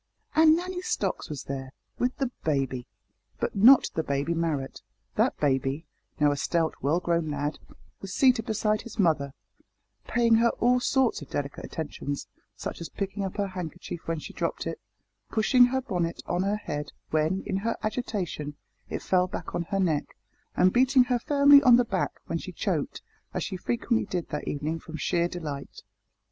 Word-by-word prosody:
And 315 0 +6
Nanny 360 +1 -3
Stocks - - -2
was 145 -4 -5
there, 135 -1 -6 0.3
with 250 +1 0
"the 265 -3 -1
baby," 135 -5 -1 0.5
but - - -2
not 245 +7 +7
the 160 - 0
baby 140 +2 -1
Marrot! 160 -5 -2 0.3
That - - +2
baby 135 +2 0 0.3
now 145 -1 +4
a 145 - -1
stout 165 +2 +1
well 150 +5 +2
grown 170 -3 0
lad 145 +1 -2 0.4
was 195 - -7
seated 250 -2 +3
beside 215 -1 +1
his 235 - -10
mother, 155 -8 +2 0.8
paying 235 -1 +3
her 235 +1 +4
all 250 +1 +4
sorts 260 - +1
of 145 - -10
delicate 140 -1 -4
attentions, 145 -2 -4 0.3
such - - -6
as 165 - -5
picking 200 0 -3
up 190 +1 -4
her 200 -1 0
handkerchief 175 -2 -6
when 165 0 -1
she 155 - -8
dropped - - -2
it, - - -4 0.5
pushing 245 +3 +5
her 265 +2 0
bonnet 175 -9 -2
on 175 - 0
her 200 +2 +1
head 145 -8 -5 0.2
when, 155 +5 +1
in 190 - -1
her 225 +4 -1
agitation, 200 - -3 0.3
it - - -4
fell 180 -1 +3
back - - -6
on 170 - -1
her 195 +2 -1
neck, 160 -6 0 0.4
and 185 0 +5
beating 260 +1 +5
her 245 -1 0
firmly 285 +2 +7
on 245 -3 +7
the 245 0 +4
back - - -2
when - - -2
she - - -7
choked, - - -2 0.3
as - - 0
she 190 - -4
frequently 230 +4 0
did 175 -2 -3
that 150 - -4
evening 150 +3 -2
from 160 -1 -8
sheer 170 +2 +1
delight. 155 -6 -6
180 Hz, 180 wpm, -27 LUFS, 150-235 Hz, 0.8 s, not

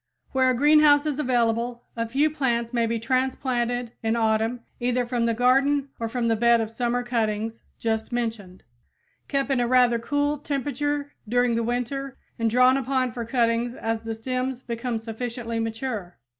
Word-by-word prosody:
Where 260 -1 +3
a 255 - +2
greenhouse 295 +2 +5
is 300 -2 -1
available, 240 -2 0
a 230 -1 -2
few 290 +5 +2
plants 240 -5 -1
may 235 -1 +2
be 230 0 -1
transplanted 245 -1 -1
in 225 0 0
autumn 225 +1 +1 0.2
either 245 0 0
from 240 -1 0
the 230 - +1
garden 270 +3 +3
or 230 -1 -2
from 240 0 -1
the 225 - +3
bed 235 +1 +4
of 220 -1 -2
summer 245 +1 -1
cuttings 225 -2 -1 0.2
just 220 0 -2
mentioned, 225 -6 -4 0.6
kept 275 -1 -1
in 265 - +2
a 240 - +1
rather 245 -1 +4
cool 290 +4 0
temperature 285 +1 -2 0.2
during 245 0 +2
the 230 - +1
winter 250 +3 -3 0.2
and 230 0 +2
drawn 250 +3 +5
upon 260 -1 0
for 235 -1 -5
cuttings 235 0 +1
as 225 -3 -2
the 225 0 -5
stems 255 +2 -3
become 235 0 -3
sufficiently 230 +1 -4
mature. 225 -5 -4
240 Hz, 170 wpm, -25 LUFS, 230-260 Hz, 0.6 s, greenhouse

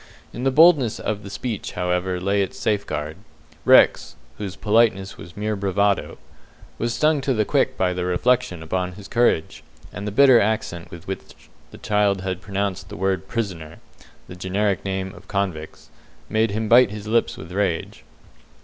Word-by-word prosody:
In 125 - -5
the - - +4
boldness 145 -5 +5
of 105 -1 -3
the 100 - -9
speech 110 0 -5
however, 90 0 -1
lay 100 +2 +1
its 95 - -3
safeguard. 80 -7 -2 0.5
Rex - - +5 0.2
whose 100 -3 -5
politeness 105 -3 +2
was 85 +3 -12
mere 105 +1 -1
bravado 100 0 0 0.6
was 120 +1 -1
stung 155 -2 +2
to 135 -1 0
the 110 -1 +1
quick - - +1
by 90 -1 +1
the 90 0 -3
reflection 90 -1 0
upon 90 +2 -2
his 100 +1 -11
courage, 115 -8 +1 0.3
and 100 +2 -6
the - - -2
bitter 130 +1 +6
accent 100 -5 -2
with 85 -1 -11
which 95 - -7 0.3
the - - -13
child 105 -2 +1
had 95 -1 -4
pronounced 100 0 -3
the - - -8
word 95 -1 -1
prisoner 90 -9 -4 0.5
(the 90 - -9
generic 95 +1 -1
name 95 -1 -3
of 95 +1 -15
convicts) 95 -6 -4 0.4
made 110 +1 +2
him 110 +2 -2
bite 120 0 +6
his 105 0 -8
lips 115 +2 0
with 85 - -10
rage. 95 -3 -2
100 Hz, 165 wpm, -22 LUFS, 90-110 Hz, 0.6 s, bitter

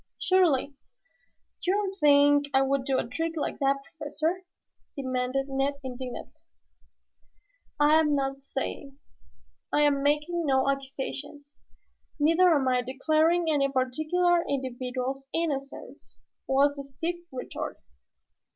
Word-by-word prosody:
"Surely, 330 -7 +2 0.9
you 365 - +2
don't 400 -2 -1
think 290 -1 +5
I 270 - +5
would 270 -1 0
do 265 -1 +1
a - - 0
trick 325 +7 -3
like 305 - -3
that, 275 0 +3
Professor?" 320 +4 -3 0.5
demanded 260 0 -1
Ned 275 +1 -1
indignantly. 255 -1 -7 1.4
"I 300 +2 +5
am 300 -2 +2
not 275 0 -2
saying. 275 0 -5 0.7
I 295 - +2
am 290 -2 +3
making 300 +4 +1
no 265 0 +2
accusations, 275 +1 -5 0.6
neither 330 +5 +5
am 280 -5 +2
I 250 -1 +2
declaring 310 +7 +1
any 275 -2 +1
particular 310 +7 +1
individual's 260 0 -3
innocence," 285 -4 -4 0.3
was 285 +2 +3
the 280 - -5
stiff 325 +6 -4
retort. 255 -1 -6
280 Hz, 115 wpm, -27 LUFS, 270-310 Hz, 1.4 s, think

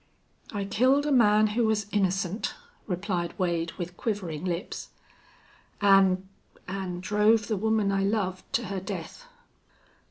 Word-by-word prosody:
"I 205 -2 -3
killed 260 +8 +3
a 300 - 0
man 215 -4 +5
who 230 0 +2
was 215 -2 +1
innocent," 195 0 0 0.3
replied 180 -2 -2
Wade, 170 -3 -1
with 175 0 -6
quivering 185 -7 -3
lips, 175 0 -4 0.9
"an' 195 -2 +4 0.4
an' 185 -2 -4
drove 210 +3 +3
the 220 - 0
woman 215 0 +1
I 195 0 +1
loved 195 -2 -1
to 235 - +1
her 195 -2 -3
death." - - -7
195 Hz, 130 wpm, -27 LUFS, 185-215 Hz, 0.9 s, man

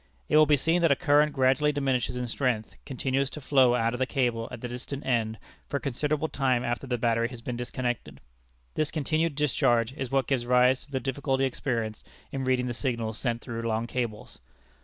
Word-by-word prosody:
It - - +1
will 155 0 +7
be 145 0 +5
seen 165 +5 +2
that 165 - +4
a - - +5
current 150 -1 +3
gradually 135 +2 +3
diminishing 135 -4 0
in 125 0 -2
strength 120 -2 -1
continues 135 0 -1
to 140 - -8
flow 130 -3 +4
out 115 -1 +1
of 120 - -4
the 130 - +1
cable 120 -5 0
at - - -8
the 125 - -3
distant 125 +3 -6
end 115 -3 0 0.3
for 140 - 0
a - - -4
considerable 150 +4 -1
time 130 -4 +1
after 120 +3 -2
the 125 -1 0
battery 115 0 +1
has 120 -2 -10
been 125 - -3
disconnected. 120 0 -4 0.5
This 155 -1 0
continued 155 0 0
discharge 125 -5 +2
is 135 -2 -4
what 135 0 +1
gives 125 -3 -1
rise 125 +1 +4
to 145 - -23
the 135 - -1
difficulty 135 +1 0
experienced 115 -5 -3 0.2
in 135 -1 -3
reading 130 -1 +2
the 125 - -2
signals 115 -4 -2
sent 120 -2 -1
through 115 -2 -5
long 115 0 -1
cables. 115 - -4
130 Hz, 205 wpm, -27 LUFS, 120-140 Hz, 0.5 s, will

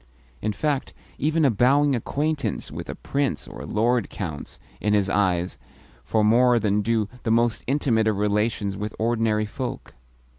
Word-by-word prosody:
In 110 - 0
fact, 140 +5 -2 0.2
even 155 +1 +2
a 135 - +5
bowing 135 +6 +3
acquaintance 140 0 -2
with - - -7
a - - -4
prince 140 -2 -2
or - - -9
a - - -7
lord 120 +1 +1
counts, 80 -8 -6 0.2
in 105 0 +1
his 100 -2 +1
eyes, 90 -3 +1 0.4
for 110 -1 +1
more 120 +3 +5
than 105 -2 +1
do 110 0 +1
the - - -3
most 115 -1 +2
intimate 125 -5 +2
of 110 -2 +1
relations 105 0 0
with 105 +2 -5
ordinary 110 -2 +1
folk. 125 +4 -6
110 Hz, 160 wpm, -24 LUFS, 105-125 Hz, 0.4 s, a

